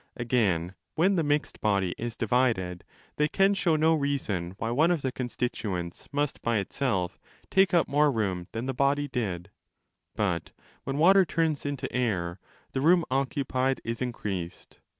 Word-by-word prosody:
Again, 100 Hz, -8 st, +1 dB, 0.2 s
when 185 Hz, +5 st, +3 dB
the 170 Hz, -, +2 dB
mixed 145 Hz, -1 st, -1 dB
body 100 Hz, -4 st, +1 dB
is 120 Hz, 0 st, -5 dB
divided, 110 Hz, -7 st, +1 dB, 0.3 s
they 150 Hz, -, +3 dB
can 195 Hz, +6 st, +3 dB
show 175 Hz, -5 st, +2 dB
no 160 Hz, +1 st, +4 dB
reason 120 Hz, -, -1 dB
why 115 Hz, +1 st, -2 dB
one 155 Hz, +8 st, +3 dB
of 170 Hz, -5 st, 0 dB
the 130 Hz, -, 0 dB
constituents 115 Hz, -8 st, -4 dB
must 145 Hz, 0 st, -1 dB
by 115 Hz, -1 st, +1 dB
itself 100 Hz, -3 st, -1 dB, 0.3 s
take 190 Hz, 0 st, +4 dB
up 170 Hz, -2 st, +3 dB
more 145 Hz, +1 st, +3 dB
room 95 Hz, -7 st, -2 dB
than 115 Hz, +2 st, -4 dB
the 135 Hz, -, -2 dB
body 140 Hz, +2 st, +1 dB
did: 100 Hz, -8 st, -3 dB, 0.6 s
but 90 Hz, -6 st, -1 dB, 0.3 s
when 135 Hz, +1 st, -2 dB
water 190 Hz, +5 st, +6 dB
turns 160 Hz, -4 st, 0 dB
into 140 Hz, -2 st, -3 dB
air, 95 Hz, -8 st, -1 dB, 0.3 s
the 130 Hz, -, -2 dB
room 170 Hz, +2 st, +4 dB
occu 135 Hz, +1 st, 0 dB
pied 130 Hz, +1 st, 0 dB
is 115 Hz, +1 st, -4 dB
increased. 100 Hz, -8 st, -5 dB
125 Hz, 160 wpm, -28 LUFS, 100-145 Hz, 0.6 s, water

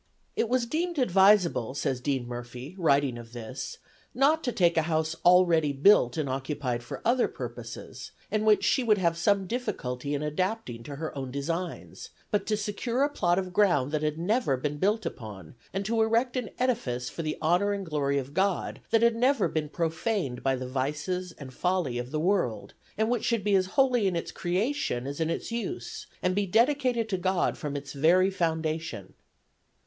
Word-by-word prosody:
"It 230 Hz, -, 0 dB
was 250 Hz, -1 st, +2 dB
deemed 335 Hz, +6 st, -2 dB
advisable," 190 Hz, -, +4 dB
says 135 Hz, -3 st, -1 dB
Dean 130 Hz, -2 st, -1 dB
Murphy, 120 Hz, +5 st, -7 dB
writing 140 Hz, -6 st, +2 dB
of 115 Hz, 0 st, -12 dB
this, 115 Hz, -2 st, -6 dB, 0.4 s
"not 295 Hz, +5 st, +3 dB
to 245 Hz, -, +1 dB
take 175 Hz, -6 st, +3 dB
a 165 Hz, -, +4 dB
house 160 Hz, 0 st, 0 dB
already 175 Hz, -4 st, +5 dB
built 140 Hz, -4 st, +5 dB
and 155 Hz, -3 st, -1 dB
occupied 130 Hz, -2 st, -2 dB
for 120 Hz, -, -8 dB
other 245 Hz, +2 st, +3 dB
purposes, -, -, -8 dB, 0.2 s
and 215 Hz, 0 st, +1 dB
which 215 Hz, -1 st, +4 dB
she 260 Hz, -, +2 dB
would 215 Hz, -3 st, +4 dB
have 170 Hz, -3 st, +1 dB
some 195 Hz, +3 st, +2 dB
difficulty 145 Hz, -, -3 dB
in 145 Hz, -, -2 dB
adapting 150 Hz, -, -2 dB
to 145 Hz, -, -6 dB
her 155 Hz, +1 st, -5 dB
own 135 Hz, -2 st, -4 dB
designs, 165 Hz, +7 st, -4 dB, 0.2 s
but 210 Hz, -, 0 dB
to 215 Hz, -, +1 dB
secure 225 Hz, +5 st, -1 dB
a 290 Hz, -, +2 dB
plot 175 Hz, -11 st, +1 dB
of 185 Hz, -1 st, -2 dB
ground 175 Hz, -10 st, +3 dB
that 155 Hz, -1 st, 0 dB
had 155 Hz, 0 st, -1 dB
never 175 Hz, -, +1 dB
been 145 Hz, +3 st, -3 dB
built 210 Hz, +5 st, +1 dB
upon, 100 Hz, -8 st, -7 dB, 0.2 s
and 195 Hz, +1 st, -3 dB
to 225 Hz, +2 st, +1 dB
erect 230 Hz, +3 st, +2 dB
an 250 Hz, -3 st, -2 dB
edifice 140 Hz, -, -1 dB
for 165 Hz, -, -5 dB
the 155 Hz, -1 st, -3 dB
honor 180 Hz, +6 st, +2 dB
and 200 Hz, -1 st, -3 dB
glory 145 Hz, -3 st, 0 dB
of 140 Hz, +1 st, -4 dB
God 190 Hz, +1 st, 0 dB
that 225 Hz, 0 st, +3 dB
had 235 Hz, -1 st, +4 dB
never 250 Hz, -1 st, +3 dB
been 155 Hz, -2 st, -2 dB
profaned 165 Hz, -, -2 dB
by 135 Hz, -1 st, +1 dB
the 130 Hz, 0 st, -5 dB
vices 150 Hz, +8 st, -2 dB
and 135 Hz, -4 st, -10 dB
folly 175 Hz, -7 st, 0 dB
of 120 Hz, 0 st, -5 dB
the 155 Hz, +2 st, -2 dB
world, 160 Hz, -, 0 dB, 0.2 s
and 220 Hz, +1 st, +2 dB
which 240 Hz, -3 st, 0 dB
should 230 Hz, -4 st, 0 dB
be 205 Hz, 0 st, +1 dB
as 185 Hz, -1 st, +3 dB
holy 250 Hz, -6 st, +4 dB
in 185 Hz, -, 0 dB
its 170 Hz, -, -3 dB
creation 180 Hz, -, -1 dB
as 140 Hz, +2 st, -5 dB
in 160 Hz, 0 st, 0 dB
its 165 Hz, -, -3 dB
use, 235 Hz, +10 st, -5 dB, 0.2 s
and 180 Hz, -, +2 dB
be 200 Hz, +1 st, 0 dB
dedicated 245 Hz, +2 st, +2 dB
to 195 Hz, -3 st, -1 dB
God 185 Hz, 0 st, +1 dB
from 150 Hz, -4 st, -5 dB
its 140 Hz, -1 st, -6 dB
very 175 Hz, +7 st, +4 dB
foundation." 160 Hz, -, -2 dB
175 Hz, 190 wpm, -28 LUFS, 140-215 Hz, 0.4 s, already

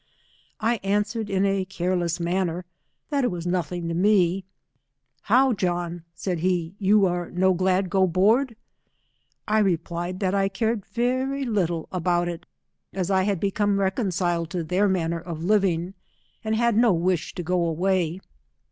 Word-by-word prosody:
I 230 Hz, +2 st, +1 dB
answered 205 Hz, +2 st, -1 dB
in 195 Hz, 0 st, +1 dB
a 195 Hz, -1 st, +1 dB
careless 180 Hz, -2 st, -1 dB
manner, 175 Hz, 0 st, -1 dB, 0.5 s
that 280 Hz, -2 st, +1 dB
it 245 Hz, -, +2 dB
was 175 Hz, -2 st, -5 dB
nothing 175 Hz, -1 st, -2 dB
to 170 Hz, -, -2 dB
me. 185 Hz, 0 st, +2 dB, 0.8 s
Hovr, 255 Hz, +3 st, +4 dB
John, 175 Hz, -3 st, -2 dB
said 180 Hz, -2 st, -3 dB
he, 175 Hz, -1 st, 0 dB
you 200 Hz, 0 st, +4 dB, 0.3 s
no 190 Hz, +1 st, +3 dB
glad 185 Hz, +1 st, +1 dB
go 190 Hz, -2 st, +3 dB
board. 220 Hz, +8 st, +2 dB, 0.9 s
I 215 Hz, 0 st, +3 dB
replied 175 Hz, -1 st, -1 dB
that 190 Hz, -2 st, 0 dB
I 195 Hz, -1 st, +2 dB
cared 220 Hz, +1 st, -2 dB
very 260 Hz, +3 st, -1 dB
little 175 Hz, -8 st, -1 dB
about 175 Hz, -1 st, 0 dB
it, 170 Hz, 0 st, -6 dB, 0.5 s
as 185 Hz, 0 st, -2 dB
I 190 Hz, -1 st, +3 dB
had 200 Hz, -3 st, 0 dB
become 200 Hz, +1 st, +1 dB
reconciled 180 Hz, -4 st, 0 dB
to 175 Hz, -2 st, -3 dB
their 185 Hz, +5 st, +1 dB
manner 170 Hz, -3 st, 0 dB
of 165 Hz, -1 st, -7 dB
living, 185 Hz, -3 st, +1 dB, 0.5 s
and 220 Hz, 0 st, 0 dB
had 235 Hz, 0 st, +2 dB
no 230 Hz, -2 st, +5 dB
wish 175 Hz, 0 st, -1 dB
to 175 Hz, -, -4 dB
go 180 Hz, +1 st, +1 dB
away. 180 Hz, +1 st, 0 dB
185 Hz, 150 wpm, -24 LUFS, 175-205 Hz, 0.9 s, no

